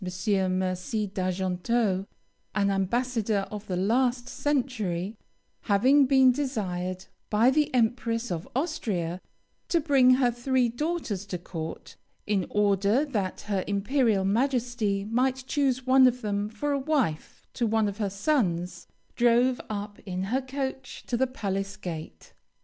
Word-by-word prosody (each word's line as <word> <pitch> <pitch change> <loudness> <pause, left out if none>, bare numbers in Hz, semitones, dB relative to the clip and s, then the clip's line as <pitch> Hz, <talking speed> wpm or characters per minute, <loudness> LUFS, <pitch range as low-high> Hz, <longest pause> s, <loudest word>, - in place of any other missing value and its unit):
Mercy 185 +3 -1
d'Argenteau, 190 +2 -1 0.5
an 200 -1 +2
ambassador 215 +1 0
of 210 0 -7
the 185 - -2
last 245 +5 +1
century, 230 -11 -1 0.5
"having 260 +7 +4
been 265 -1 +6
desired 190 -9 -3 0.2
by 225 +4 +4
the 300 +1 +2
Empress 235 -1 0
of 170 -2 -4
Austria 195 - -2 0.5
to 340 - +2
bring 270 -5 +5
her 250 -2 +2
three 245 +1 +1
daughters 240 - -2
to 185 - -3
court, 165 -2 -7 0.3
in 200 -4 0
order 205 +5 +2
that 205 -10 -3
her 200 -3 -2
Imperial 205 0 +1
Majesty 230 -3 0
might 255 +4 0
choose 260 -2 0
one 260 0 +6
of 250 -1 -1
them 205 0 -1
for 225 +7 -3
a 280 - +1
wife 265 - -1
to 235 - 0
one 220 -1 +2
of 200 +1 -5
her 205 -2 0
sons, 180 - -1 0.3
drove 245 +1 +3
up 205 -1 -5
in 185 -1 -4
her 265 - +2
coach 265 0 -5
to 245 - -2
the 260 +2 +2
palace 195 -5 -3
gate. 160 -3 -8
220 Hz, 135 wpm, -27 LUFS, 195-255 Hz, 0.5 s, been